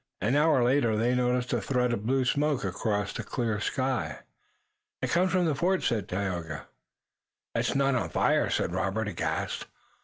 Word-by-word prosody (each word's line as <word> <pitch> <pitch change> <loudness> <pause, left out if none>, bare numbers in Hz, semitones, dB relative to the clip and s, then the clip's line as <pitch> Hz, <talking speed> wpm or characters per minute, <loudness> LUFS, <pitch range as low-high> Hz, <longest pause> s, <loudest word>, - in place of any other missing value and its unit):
An 120 +6 +1
hour 150 -4 +4
later 120 -3 +2
they 120 +3 +2
noticed 125 0 +1
a 120 - +1
thread 125 +2 +1
of 110 -1 -3
blue 130 0 +2
smoke 145 0 +1
across 105 -3 -1
the 115 - -4
clear 110 0 -2
sky. 130 +4 -1 0.8
"It - - -2
comes 185 +2 +3
from 185 -1 +2
the 160 - +2
fort," 180 +7 +1
said 110 -5 0
Tayoga. 90 -5 -3 0.9
"It's - - 0
not 140 0 +3
on 130 - 0
fire?" - - +2
said - - 0
Robert, 95 +4 -1
aghast. 80 -4 -2
125 Hz, 165 wpm, -28 LUFS, 105-135 Hz, 0.9 s, hour